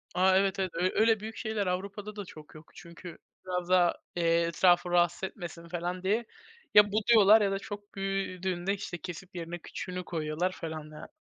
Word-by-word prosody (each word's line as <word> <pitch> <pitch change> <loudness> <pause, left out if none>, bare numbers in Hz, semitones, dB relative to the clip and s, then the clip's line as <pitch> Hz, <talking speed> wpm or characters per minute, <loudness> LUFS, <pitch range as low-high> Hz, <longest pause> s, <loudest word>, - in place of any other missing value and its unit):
A, 190 +1 +4
evet, 195 0 +1
evet, 185 -2 -1
ö 180 +2 +1
öyle, 220 -1 +4
büyük 220 +1 -7
şeyler 220 -3 -2
Avrupa'da 200 +3 -4
da 205 -2 -6
çok 155 -2 -13
yok. 155 - -14
Çünkü 170 0 -11 0.3
biraz 180 -1 -3
daha, 180 -2 +4 0.2
eee, 170 -1 +2
etrafı 175 +1 +3
rahatsız 175 +1 +2
etmesin 170 -3 -6
falan 175 +2 -4
diye 220 +5 +1 0.5
ya, 205 -1 +7
buduyorlar 215 0 +6
ya 200 -1 +2
da 195 - -1
çok 205 -1 -9
büyüdüğünde, 190 -1 -2
işte, 185 -3 -5
kesip 180 +1 -9
yerine 170 0 -5
küçüğünü 180 +2 -6
koyuyorlar 160 +2 -2
falan 155 -3 -7
yani. 150 - -10
185 Hz, 175 wpm, -29 LUFS, 175-200 Hz, 0.5 s, ya